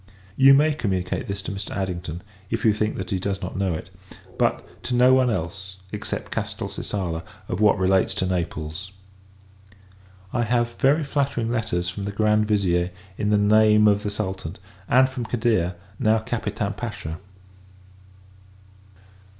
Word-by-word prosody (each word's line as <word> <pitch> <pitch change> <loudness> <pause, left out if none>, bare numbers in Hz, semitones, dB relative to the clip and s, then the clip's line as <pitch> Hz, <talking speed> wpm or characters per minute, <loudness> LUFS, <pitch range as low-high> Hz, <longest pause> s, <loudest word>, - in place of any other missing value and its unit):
You 135 +3 +8
may 150 +2 +4
communicate 95 -10 -2
this 100 0 -4
to - - -4
Mr. 100 +1 -5
Addington, 90 -3 -4 0.3
if 115 0 -2
you 110 - +6
think 105 +1 -1
that 95 -1 -5
he 95 - 0
does 100 +1 -2
not - - -6
know 95 -3 0
it; - - -8 0.4
but, - - 0 0.2
to 125 - -1
no 125 +1 +6
one 130 -1 +4
else, 95 -1 -4
except - - -5
Castelcicala, 85 -5 -3 0.3
of 90 - -3
what 105 -1 +5
relates 95 0 +2
to 95 - 0
Naples. 85 0 -3 1.4
I 120 - +1
have 120 0 +1
very 145 +4 +3
flattering 140 -5 -1
letters 110 -7 -1
from 100 +2 -4
the 100 - -2
Grand 105 +1 +2
Vizier, 90 -4 +2 0.3
in 105 - +1
the 105 - +4
name 105 +1 +5
of 105 0 +4
the 105 - -2
Sultan; 95 -4 -4 0.3
and 130 +1 +6
from 130 -2 -5
Cadir, 110 -6 +1 0.2
now 110 -2 +4
Capitan 110 -2 -2
Pacha. 105 -7 -5
105 Hz, 150 wpm, -24 LUFS, 95-115 Hz, 1.4 s, You